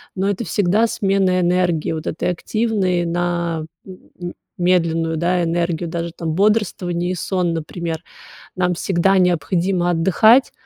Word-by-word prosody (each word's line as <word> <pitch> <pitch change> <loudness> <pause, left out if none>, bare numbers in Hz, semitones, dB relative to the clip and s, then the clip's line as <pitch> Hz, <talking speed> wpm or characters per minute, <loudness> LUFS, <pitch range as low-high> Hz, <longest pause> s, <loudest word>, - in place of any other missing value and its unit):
но 190 0 0
это 205 +3 -1
всегда 205 +2 +2
смена 195 -3 +1
энергии 175 -2 +1
вот 160 -1 -4
этой 160 - -2
активной 190 -2 0
на 170 -1 -1 0.2
м 180 -1 -10 0.3
медленную, 165 -2 +1
да, 175 +2 +1
энергию, 170 0 -1
даже 170 0 -3
там 160 -2 -3
бодрствование 185 -4 +1
и - - -2
сон, 180 -1 -1
например, 165 +1 -4 0.5
нам 180 -1 +1
всегда 190 +2 +1
необходимо 175 +1 +1
отдыхать 195 +9 +4
175 Hz, 130 wpm, -20 LUFS, 170-190 Hz, 0.5 s, отдыхать